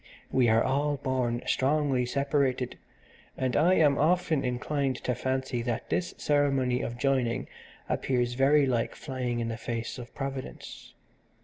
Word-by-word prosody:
We 125 Hz, -3 st, +3 dB
are 110 Hz, +1 st, +4 dB
all 145 Hz, +2 st, +1 dB
born 130 Hz, -3 st, -1 dB
strongly 135 Hz, -2 st, +1 dB
separated, 140 Hz, -2 st, 0 dB, 0.6 s
and 130 Hz, -1 st, -1 dB
I 175 Hz, +5 st, +4 dB
am 145 Hz, -4 st, +4 dB
often 160 Hz, -2 st, +2 dB
inclined 130 Hz, +2 st, -1 dB
to 125 Hz, -, 0 dB
fancy 130 Hz, 0 st, -2 dB
that 120 Hz, -1 st, -3 dB
this 175 Hz, -, -1 dB
ceremony 135 Hz, -4 st, +1 dB
of 120 Hz, -, -4 dB
joining 130 Hz, -1 st, 0 dB, 0.4 s
appears 125 Hz, -2 st, 0 dB
very 140 Hz, +3 st, +4 dB
like 120 Hz, -3 st, 0 dB
flying 125 Hz, -3 st, -3 dB
in 115 Hz, -1 st, -2 dB
the 115 Hz, -, -4 dB
face 115 Hz, +2 st, -4 dB
of 120 Hz, 0 st, -10 dB
Providence. 135 Hz, -1 st, -7 dB
130 Hz, 140 wpm, -28 LUFS, 125-140 Hz, 0.6 s, are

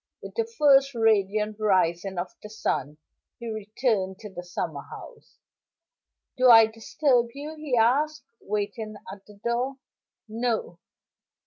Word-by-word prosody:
With -, -, -8 dB
the 460 Hz, 0 st, -2 dB
first 275 Hz, -2 st, +5 dB
radiant 215 Hz, -1 st, +1 dB
rising 190 Hz, -2 st, +1 dB
of 175 Hz, +1 st, -3 dB
the 210 Hz, -, -9 dB
sun 150 Hz, -8 st, -2 dB, 0.4 s
he 235 Hz, -, -8 dB
returned 210 Hz, -2 st, -1 dB
to 210 Hz, -3 st, -9 dB
the 175 Hz, -, -6 dB
summer 180 Hz, 0 st, -4 dB
house. -, -, -13 dB, 1.0 s
"Do 255 Hz, 0 st, +5 dB
I 225 Hz, -1 st, +9 dB
disturb 235 Hz, +3 st, +1 dB
you?" 295 Hz, +2 st, -6 dB
he 300 Hz, -5 st, -2 dB
asked, 275 Hz, +5 st, +2 dB
waiting 210 Hz, +1 st, -4 dB, 0.2 s
at 200 Hz, 0 st, -15 dB
the 210 Hz, -, -15 dB
door. 240 Hz, +5 st, -2 dB, 0.5 s
"No." 225 Hz, -5 st, -2 dB
220 Hz, 130 wpm, -26 LUFS, 200-255 Hz, 1.0 s, I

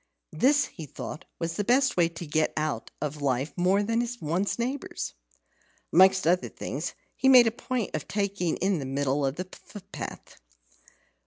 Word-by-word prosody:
This, 285 Hz, +2 st, +3 dB
he 160 Hz, -5 st, -9 dB
thought, 150 Hz, +4 st, -7 dB
was 165 Hz, 0 st, -3 dB
the 245 Hz, +5 st, +3 dB
way 170 Hz, -2 st, +3 dB
to 170 Hz, +1 st, -8 dB
get 155 Hz, +1 st, 0 dB
more 155 Hz, -, +1 dB
out 115 Hz, -5 st, -5 dB
of 150 Hz, 0 st, -4 dB
life 135 Hz, +1 st, 0 dB
than 205 Hz, +6 st, +2 dB
one's 175 Hz, +6 st, -1 dB
neighbours. 255 Hz, +3 st, -3 dB, 0.8 s
Amongst 190 Hz, +1 st, +6 dB
other 180 Hz, +2 st, +2 dB
things, -, -, -5 dB, 0.2 s
he 265 Hz, -, +3 dB
made 250 Hz, -2 st, +9 dB
a 225 Hz, -, +2 dB
point 240 Hz, 0 st, -3 dB
of -, -, -3 dB
taking 200 Hz, -4 st, -1 dB
the 185 Hz, -5 st, 0 dB
middle 140 Hz, +1 st, 0 dB
of 135 Hz, 0 st, 0 dB
the 185 Hz, +2 st, -5 dB
footpath. 200 Hz, -1 st, -9 dB
185 Hz, 155 wpm, -27 LUFS, 155-225 Hz, 0.8 s, made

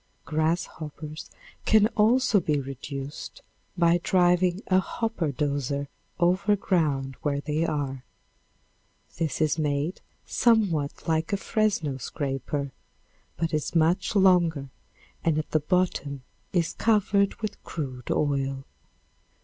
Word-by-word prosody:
Grasshoppers 155 Hz, -1 st, -3 dB, 0.3 s
can 215 Hz, -1 st, +5 dB
also 225 Hz, +1 st, +4 dB
be 150 Hz, -4 st, 0 dB
reduced 135 Hz, +1 st, -7 dB, 0.3 s
by 170 Hz, 0 st, +4 dB
driving 180 Hz, +1 st, +3 dB
a 185 Hz, 0 st, +4 dB
"hopper 190 Hz, -5 st, -2 dB
doser" 140 Hz, 0 st, -1 dB, 0.3 s
over 185 Hz, +4 st, +3 dB
ground 145 Hz, -9 st, 0 dB
where 140 Hz, -1 st, 0 dB
they 155 Hz, +3 st, -1 dB
are. 135 Hz, -4 st, -3 dB, 1.2 s
This 160 Hz, -3 st, -1 dB
is 155 Hz, +1 st, +2 dB
made 150 Hz, +3 st, -1 dB, 0.2 s
somewhat 195 Hz, -12 st, +1 dB
like 160 Hz, 0 st, 0 dB
a 200 Hz, -, +2 dB
Fresno 195 Hz, -10 st, 0 dB
scraper, 140 Hz, +1 st, -3 dB, 0.7 s
but 165 Hz, 0 st, -1 dB
is 155 Hz, +2 st, -1 dB
much 170 Hz, +6 st, +2 dB
longer 175 Hz, -7 st, +4 dB, 0.5 s
and 160 Hz, -2 st, +2 dB
the 155 Hz, 0 st, 0 dB
bottom 150 Hz, -5 st, -1 dB, 0.3 s
is 170 Hz, -3 st, +1 dB
covered 205 Hz, -2 st, +2 dB
with 215 Hz, -3 st, -6 dB
crude 130 Hz, -6 st, -6 dB
oil. 135 Hz, -2 st, 0 dB
160 Hz, 110 wpm, -26 LUFS, 145-185 Hz, 1.2 s, can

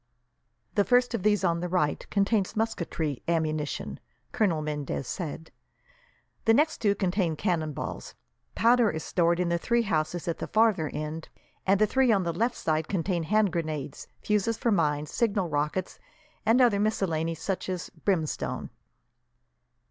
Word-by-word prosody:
"The 205 Hz, -, +3 dB
first 245 Hz, +2 st, +3 dB
of 230 Hz, -, -1 dB
these 210 Hz, 0 st, +2 dB
on 170 Hz, -2 st, +2 dB
the 180 Hz, +1 st, -3 dB
right 160 Hz, -5 st, 0 dB
contains 200 Hz, 0 st, +1 dB
musketry 170 Hz, -, -2 dB
ammunition," 155 Hz, -3 st, -1 dB, 0.3 s
Colonel 175 Hz, -9 st, +1 dB
Mendez 150 Hz, -3 st, -3 dB
said, 160 Hz, -2 st, -5 dB, 0.9 s
"the 225 Hz, -, +5 dB
next 305 Hz, +4 st, +2 dB
two 205 Hz, -2 st, +2 dB
contain 185 Hz, -4 st, 0 dB
cannonballs; 155 Hz, -5 st, -3 dB, 0.4 s
powder 235 Hz, -1 st, +4 dB
is 160 Hz, -3 st, -4 dB
stored 170 Hz, -1 st, +1 dB
in 180 Hz, -1 st, +1 dB
the 170 Hz, 0 st, +1 dB
three 235 Hz, +5 st, +1 dB
houses 165 Hz, -3 st, -1 dB
at 170 Hz, -, -2 dB
the -, -, -4 dB
farther 215 Hz, -8 st, +2 dB
end, 155 Hz, +1 st, -5 dB, 0.4 s
and 195 Hz, +1 st, +4 dB
the 215 Hz, -, +5 dB
three 260 Hz, +3 st, +3 dB
on 195 Hz, -3 st, +3 dB
the 170 Hz, -1 st, -1 dB
left 230 Hz, +7 st, 0 dB
side 155 Hz, 0 st, -1 dB
contain 180 Hz, -2 st, -1 dB
hand 210 Hz, +3 st, +2 dB
grenades, 155 Hz, -4 st, -4 dB, 0.2 s
fuses 210 Hz, +1 st, +1 dB
for 235 Hz, -, +1 dB
mines, 150 Hz, -5 st, +1 dB
signal 200 Hz, -6 st, 0 dB
rockets, 150 Hz, +5 st, -2 dB, 0.5 s
and 235 Hz, +4 st, +5 dB
other 230 Hz, -5 st, +4 dB
miscellanies, 165 Hz, -6 st, 0 dB
such 190 Hz, -1 st, -3 dB
as 180 Hz, -2 st, -4 dB
brimstone." 165 Hz, -7 st, -2 dB
180 Hz, 150 wpm, -27 LUFS, 160-215 Hz, 0.9 s, the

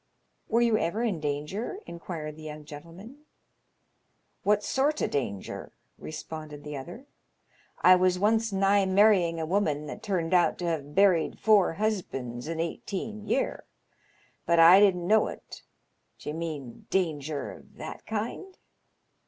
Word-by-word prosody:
" -, -, -46 dB
Were 235 Hz, +1 st, +3 dB
you 230 Hz, -2 st, +3 dB
ever 200 Hz, +8 st, -1 dB
in 205 Hz, -8 st, -1 dB
danger? 150 Hz, -, -3 dB
" -, -, -36 dB
inquired 165 Hz, -3 st, -6 dB
the 155 Hz, -, -13 dB
young 150 Hz, -1 st, -8 dB
gentleman. 175 Hz, -, -12 dB, 1.2 s
What 210 Hz, 0 st, +2 dB
sort 290 Hz, +3 st, +1 dB
o' -, -, +2 dB
danger?" 100 Hz, -9 st, -4 dB, 0.3 s
responded 155 Hz, -1 st, -8 dB
the 150 Hz, 0 st, -6 dB
other. 175 Hz, -, -8 dB, 0.8 s
"I 185 Hz, -, +8 dB
was 180 Hz, 0 st, +2 dB
once 220 Hz, +3 st, +2 dB
nigh 195 Hz, 0 st, +3 dB
marrying 190 Hz, -4 st, +4 dB
a 160 Hz, -, -2 dB
woman 155 Hz, -5 st, 0 dB
that 180 Hz, -, -7 dB
turned 185 Hz, -6 st, -1 dB
out 175 Hz, -1 st, +3 dB
to 175 Hz, -, -4 dB
have 150 Hz, -4 st, -3 dB
buried 185 Hz, -5 st, +3 dB
four 210 Hz, -5 st, +4 dB
husbands 155 Hz, -, -3 dB
in 165 Hz, 0 st, -4 dB
eighteen 210 Hz, +5 st, -4 dB
year, 270 Hz, -, -1 dB, 0.8 s
but 170 Hz, -, +3 dB
I 170 Hz, +4 st, +9 dB
didn't 185 Hz, -4 st, +3 dB
know 215 Hz, +4 st, +4 dB
it. -, -, -9 dB, 0.6 s
D'ye 150 Hz, -, -6 dB
mean 155 Hz, -7 st, -6 dB
danger 155 Hz, -5 st, -1 dB
of -, -, -15 dB
that -, -, -8 dB
kind 230 Hz, -, -4 dB
180 Hz, 145 wpm, -28 LUFS, 155-210 Hz, 1.2 s, I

